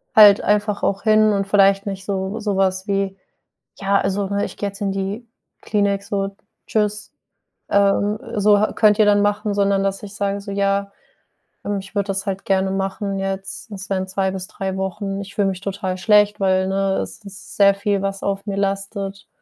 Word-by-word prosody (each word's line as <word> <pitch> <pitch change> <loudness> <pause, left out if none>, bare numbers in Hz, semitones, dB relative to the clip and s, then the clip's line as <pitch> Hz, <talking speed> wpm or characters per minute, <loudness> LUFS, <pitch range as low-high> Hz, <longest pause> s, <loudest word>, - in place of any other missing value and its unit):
halt 205 -2 +8
einfach 210 0 0
auch 195 0 0
hin 215 -1 +4
und 195 -1 -1
vielleicht 195 0 +4
nicht 195 -1 -5
so 195 +2 -2
so 205 -2 -1
was 190 +1 0
wie: 195 -1 -1 0.6
„Ja, 200 0 +1
also, 195 0 -1
ne, 200 +1 0
ich - - -8
gehe 205 - -2
jetzt 200 +2 -13
in 200 - 0
die 195 +4 -4 0.4
Klinik 200 -2 0
so, 195 -1 -2 0.3
tschüss, 210 -1 -1 0.6
ähm, 200 +1 +2 0.2
so 205 0 +5
ha 215 - +1
könnt 210 -1 +4
ihr 215 - +5
dann 205 0 +4
machen“, 205 0 0
sondern 200 -1 +2
dass 195 0 -2
ich 205 -1 -9
sage 200 -1 -2
so: 200 0 -8
„Ja, 200 0 0 0.8
ähm, 205 0 -1
ich 195 +1 -11
würde 200 -1 0
das 195 0 -2
halt 195 0 -3
gerne 190 0 +1
machen 195 +1 -2
jetzt. 195 +3 -4
Das 195 0 -7
wären 190 -1 -1
2 190 0 -1
bis 190 0 -5
3 190 -3 -4
Wochen. 195 +1 -3
Ich 200 0 -10
fühle 200 -2 +2
mich 190 0 -5
total 190 -2 -3
schlecht, 210 0 +4
weil, 190 -1 +2
ne, 195 0 0
es - - -10
ist 200 -1 -11
sehr 200 -1 +6
viel, 200 0 0
was 195 0 -3
auf 200 0 -2
mir 195 - -2
lastet, 195 0 -3
200 Hz, 200 wpm, -21 LUFS, 195-205 Hz, 0.8 s, halt